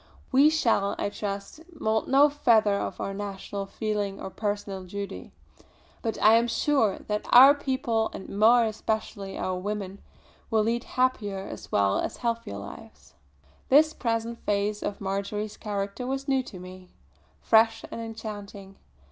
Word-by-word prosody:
We 280 +3 +6
shall, 230 -10 +1
I - - -1
trust, 200 +5 -5 0.2
moult 220 0 0
no 275 +2 +6
feather 230 -8 +3
of 200 - -3
our 195 - -3
national 200 0 -5
feeling 205 -2 -3
of 190 - -8
personal 205 -2 -3
duty; 200 +2 -7 0.7
but 225 -2 -3
I 220 +2 +7
am 235 +1 +2
sure 235 -3 +1
that 210 0 -2
our 265 +3 +9
people, 260 -5 -1
and - - -8
more 225 +4 +5
especially 215 -2 -3
our 185 -1 -2
women, 200 0 -5 0.5
will 220 -2 +2
lead 230 +2 -1
happier 205 -7 -1
as - - -9
well 100 -1 +2
as - - -3
healthier 230 - -3
lives." 100 0 -11 0.6
This 310 +3 +5
present 230 -2 -2
phase 205 +1 0
of 205 - -4
Marjory's 200 +2 -3
character 205 +3 -4
was 270 +1 -3
new 270 -1 +2
to 185 - -10
me, 185 0 -11 0.5
fresh 225 0 +3
and 230 - -5
enchanting. 205 -3 -8
215 Hz, 150 wpm, -27 LUFS, 200-235 Hz, 0.7 s, our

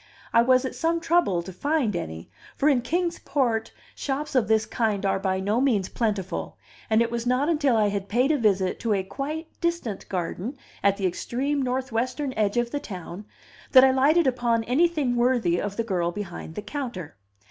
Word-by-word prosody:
I 230 - +6
was 255 +2 +3
at 260 - -3
some 335 0 0
trouble 325 - +2
to 190 - -9
find 280 - 0
any; 80 - -5 0.3
for 285 - +1
in 265 -4 +3
Kings 340 +7 -1
Port 235 -6 0 0.2
shops 285 +2 -3
of 255 -5 +2
this 220 0 +3
kind 215 -4 -1
are 195 - +1
by 190 -1 0
no 205 +5 0
means 220 -9 +1
plentiful, 210 -5 -2 0.3
and 220 +1 +4
it 230 - -3
was 235 0 -3
not 255 +5 +2
until 290 -7 +2
I 210 -1 +3
had 200 -1 -4
paid 250 +6 +2
a 305 - +2
visit 195 -4 +1
to 230 -2 0
a 190 - -1
quite 300 - -5
distant 340 - -2
garden 190 - -3 0.2
at 200 0 +3
the 195 - -2
extreme 265 +10 -1
northwestern 255 +1 -2
edge 215 0 0
of 240 0 0
the 290 - -1
town 185 -3 -8 0.5
that 260 -1 +9
I 265 - +6
lighted 290 +6 +4
upon 240 -3 +1
anything 280 0 +1
worthy 240 -8 +2
of 205 -1 -4
the 230 - +1
girl 180 -6 -1
behind 175 -4 -7
the 210 - -5
counter. 235 - -5
235 Hz, 190 wpm, -25 LUFS, 200-275 Hz, 0.5 s, that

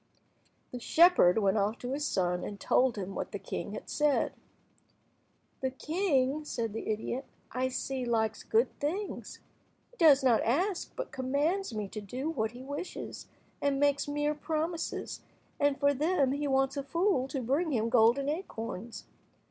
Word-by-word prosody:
The 250 - -5
shepherd 320 - +5
went 200 -1 +3
off 210 +3 0
to 245 - -5
his 290 +2 -1
son, 180 -1 0
and 205 -1 -6
told 255 -3 +2
him 195 -1 -4
what - - -4
the - - -3
king - - -5
had - - -7
said. 295 -2 +1 1.3
"The 265 - 0
king," 300 -1 0
said 230 -7 -3
the 225 - -5
idiot, 220 +4 -2 0.3
"I 255 +1 0
see, 260 0 -3
likes 220 -2 0
good 455 +2 +1
things. 370 +8 -4 0.5
He - - -22
does 295 -5 +6
not 240 -4 +4
ask, 350 - 0
but - - -5
commands 285 +9 0
me 210 -2 -2
to 215 - -6
do 255 +10 -4
what 220 -8 -1
he 250 +1 -9
wishes, 285 +6 -6 0.3
and 280 -1 +1
makes 285 0 +2
mere 295 +1 0
promises, 320 +2 -3 0.4
and 285 -1 +2
for 285 0 +4
them 290 -1 +2
he 290 +1 -1
wants 270 +1 +1
a - - 0
fool 335 -1 +1
to 270 - -3
bring 280 +7 0
him 230 -3 +1
golden 240 +3 +4
acorns. 235 - -5
270 Hz, 165 wpm, -30 LUFS, 235-300 Hz, 1.3 s, does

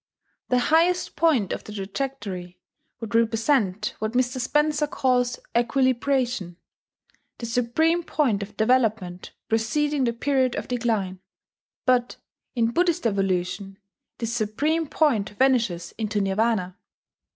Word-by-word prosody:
The 250 - +3
highest 330 +7 +2
point 285 - +2
of - - -5
the - - -10
trajectory 200 -4 -5 0.4
would 225 -1 -6
represent 225 -3 +1
what 220 +1 -2
Mr. 255 +1 0
Spencer 295 +3 +1
calls 250 -3 +1 0.2
Equilibration, 245 -5 +1 0.8
the 235 - -6
supreme 250 +9 +1
point 260 -11 0
of 200 +1 -8
development 220 -6 +1
preceding 270 +6 +1
the 235 - 0
period 260 0 +1
of - - -4
decline; 220 -7 -1 0.7
but, 250 -1 +2 0.4
in 230 -1 +2
Buddhist 345 +2 +1
evolution, 195 -1 -1 0.4
this 230 0 -3
supreme 290 +9 0
point 245 -11 +1
vanishes 235 -10 +1
into 215 -1 -1
Nirvana. 195 -1 0
235 Hz, 115 wpm, -24 LUFS, 210-270 Hz, 0.8 s, The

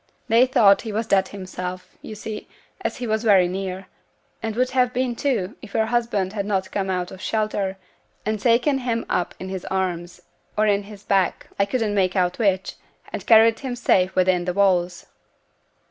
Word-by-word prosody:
They 235 +3 +5
thought 205 -6 +5
he 225 - -5
was 220 +2 -1
dead 190 -3 +2
himself, 185 -2 -7
you 215 - -8
see, 210 0 -7 0.4
as - - -2
he 250 - -4
was 220 0 -1
very 195 -5 +5
near; 190 +1 -4 0.6
and 225 -1 -3
would 255 +2 +1
have 250 -1 +2
been 250 -1 -1
too, 230 -8 -1
if 200 - -11
your 220 - +3
husband 220 -5 0
had 200 -2 -3
not 190 -2 -1
come 195 -1 -2
out 180 -1 -2
of 190 - -10
shelter, 210 -3 -1 0.5
and 215 0 -1
taken 250 +5 +3
him 235 -2 -2
up 180 - -1
in 190 - -6
his 190 -1 -5
arms 180 -2 -3 0.3
or 215 0 +3
on 205 -1 +3
his 205 -1 -12
back 195 -3 0
(I 200 - +4
couldn't 220 -1 -1
make 185 -3 +1
out 180 +1 +1
which), 195 -4 0 0.4
and - - -4
carried 225 0 +6
him 260 -3 -4
safe 190 -6 +2
within 185 -1 +2
the 180 - -1
walls.' 180 -2 +1
200 Hz, 190 wpm, -23 LUFS, 185-225 Hz, 0.6 s, carried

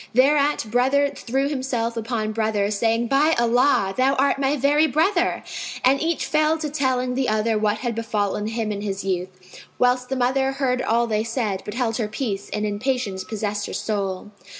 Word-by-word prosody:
Thereat 285 +1 +3
brother 265 +4 +3
threw 270 +3 -1
himself 255 -5 -2
upon 225 -1 -2
brother 215 -2 0
saying, 225 +3 +1
"By 290 +6 +3
Allah, 235 -4 +3
thou 265 +2 +2
art 275 +1 +2
my 275 +1 +1
very 290 +3 +3
brother!" 345 +6 +1 0.4
And 270 +2 +4
each 330 0 0
fell 310 +1 +2
to 305 -2 -4
telling 255 -3 0
the 260 0 0
other 215 +1 +1
what 210 0 +1
had 240 +1 -3
befallen 210 -2 -2
him 225 -1 -2
in 200 -1 -4
his 200 -1 -3
youth, 185 0 -5
whilst 250 0 +2
the 265 - -1
mother 265 +2 +1
heard 255 -2 0
all 235 -1 +2
they 215 -2 0
said, 225 -4 -2
but 210 - -6
held 235 -3 0
her 225 -4 -1
peace 210 -3 -4
and 210 0 -2
in 205 -1 -3
patience 235 -7 -2
possessed 205 0 -3
her - - -7
soul. 200 -2 -3
235 Hz, 185 wpm, -23 LUFS, 210-270 Hz, 0.4 s, And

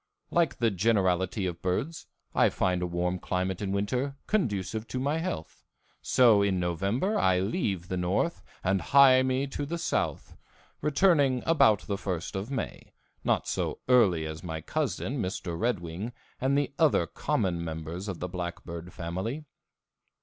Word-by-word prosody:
Like 165 -5 +2
the 115 -2 +2
generality 95 -1 +1
of 85 -1 -4
birds, 115 - -2 0.3
I - - +4
find 90 -1 0
a 90 - 0
warm 90 +1 -1
climate 95 +1 -2
in 100 -2 -2
winter 125 +8 -1
conducive 110 - -1
to 130 - -3
my 145 +5 0
health, 90 - -5 0.4
so 115 -5 +5
in 100 -2 +1
November 100 - 0
I 95 -1 +3
leave 95 - -1
the 95 - -2
north 90 - 0 0.2
and 95 0 +1
hie 130 +3 +6
me 130 +1 +1
to 140 +1 -4
the 165 +4 -3
south, - - -2 0.5
returning 145 -5 +3
about 110 - +4
the 100 -1 -3
first 90 -2 -3
of 95 +5 -3
May, 135 - -5 0.3
not - - +1
so - - -1
early 100 -11 +4
as 80 +1 -6
my 80 -2 -4
cousin, 130 - -2
Mr. 90 -2 -3
Red 110 +1 0
Wing, 90 +8 -5 0.3
and 135 +2 +2
the 145 -1 0
other 150 - +4
common 85 +1 -1
members 80 +4 -5
of 95 -4 -4
the 90 - -3
blackbird 85 -1 -6
family. 95 - -4
100 Hz, 155 wpm, -28 LUFS, 90-130 Hz, 0.5 s, hie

